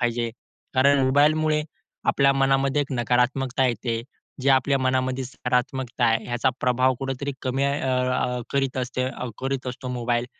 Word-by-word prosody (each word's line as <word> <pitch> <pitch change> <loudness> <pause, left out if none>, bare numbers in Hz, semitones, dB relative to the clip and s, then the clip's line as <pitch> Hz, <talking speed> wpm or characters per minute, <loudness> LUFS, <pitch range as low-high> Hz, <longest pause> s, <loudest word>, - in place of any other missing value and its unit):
पाहिजे. 120 -1 0 0.4
कारण 140 +2 +5
मोबाईलमुळे 150 +3 +3 0.4
आपल्या 140 0 +4
मनामध्ये 135 +1 +2
एक 140 -1 -7
नकारात्मकता 125 +2 +1
येते. 115 0 -2 0.4
जे 140 - +3
आपल्या 135 +1 +3
मनामध्ये 130 0 0
सकारात्मकता 125 0 -1
आहे 115 -1 +2
ह्याचा 120 +2 0
प्रभाव 130 +1 +2
कुठेतरी 135 +1 -3
कमी 130 +2 0
अ, 140 - +1 0.4
अ, 125 -1 -1
करीत 135 -2 0
असते 130 0 -2 0.3
करीत 135 0 -3
असतो 130 +1 -6
मोबाईल. 120 -1 -1
130 Hz, 140 wpm, -24 LUFS, 125-135 Hz, 0.4 s, कारण